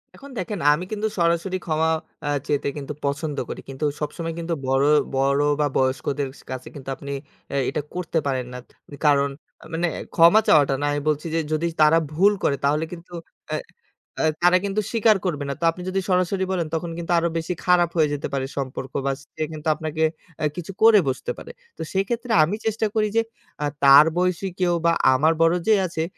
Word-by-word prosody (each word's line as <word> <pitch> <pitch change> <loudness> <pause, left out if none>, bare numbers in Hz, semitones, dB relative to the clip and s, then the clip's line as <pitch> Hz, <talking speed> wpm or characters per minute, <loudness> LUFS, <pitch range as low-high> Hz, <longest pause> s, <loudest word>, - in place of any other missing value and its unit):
এখন 280 +1 -12
দেখেন 185 +1 -4
আমি 175 +5 -3
কিন্তু 215 0 -1
সরাসরি 170 +3 +1
ক্ষমা 160 0 +1 0.4
আ - - 0 0.2
চেতে 145 -1 0
কিন্তু 145 +1 -5
পছন্দ 145 +1 -2
করি। - - -6
কিন্তু 135 +3 -3
সবসময় 165 +2 -4
কিন্তু 170 0 -2
বড় 135 +1 +2 0.3
বড় 140 +1 +2 0.2
বা 145 - +3
বয়স্কদের 135 +2 0
স - - -15
কাছে 130 -1 -6
কিন্তু 135 -1 -8
আপনি 140 +2 -8 0.4
এ - - -1
এটা 150 - -2
করতে 175 -2 -1
পারেন 130 -2 -1
না। - - -6 0.5
কারণ 140 -1 +4 0.3
অ্যা - - -15
মানে 170 +2 0 0.3
ক্ষমা 170 +6 +7
চাওয়াটা 145 -3 +5
না। - - 0
আমি 145 0 -1
বলছি 150 +2 -1
যে - - +2
যদি 165 +2 0
তারা 155 +2 +6
ভুল 195 +7 +4
করে 140 - +2
তাহলে 150 +3 +2
কিন্তু 175 +1 -11 0.4
অ্যা - - -1 0.6
অ্যা - - +2 0.2
তারা 180 +1 +6
কিন্তু 200 +2 0
স্বীকার 225 -2 +4
করবে 150 -5 -1
না। - - -1
তো - - +1
আপনি 180 - -10
যদি 195 +1 0
সরাসরি 185 +1 +1
বলেন, 170 -4 -1
তখন 165 +1 -3
কিন্তু 170 0 -4
আরো 170 0 0
বেশি 165 +2 -2
খারাপ 175 -2 +4
হয়ে 150 -2 +3
যেতে 145 - -3
পারে 135 -1 -1
সম্পর্ক 130 -1 -4
বা 140 - +2
সে 155 - -6
কিন্তু 155 +1 -7
আপনাকে 160 0 -3 0.4
অ্যা 150 - +1
কিছু 175 +2 -5
করে 220 -2 +8
বসতে 130 - -3
পারে। - - -9 0.3
তো - - -8
সেই 195 +1 +2
ক্ষেত্রে 235 0 -3
আমি 185 +7 0
চেষ্টা 220 0 0
করি 215 -1 +2
যে - - +6 0.4
আ - - +1 0.2
তার 140 +2 +9
বয়সী 180 +1 0
কেউ 175 -1 +2
বা 170 - +5 0.2
আমার 155 +5 +3
বড় 165 +1 +4
যে 220 - +6
আছে, 160 -1 -3
165 Hz, 200 wpm, -23 LUFS, 145-180 Hz, 0.6 s, তার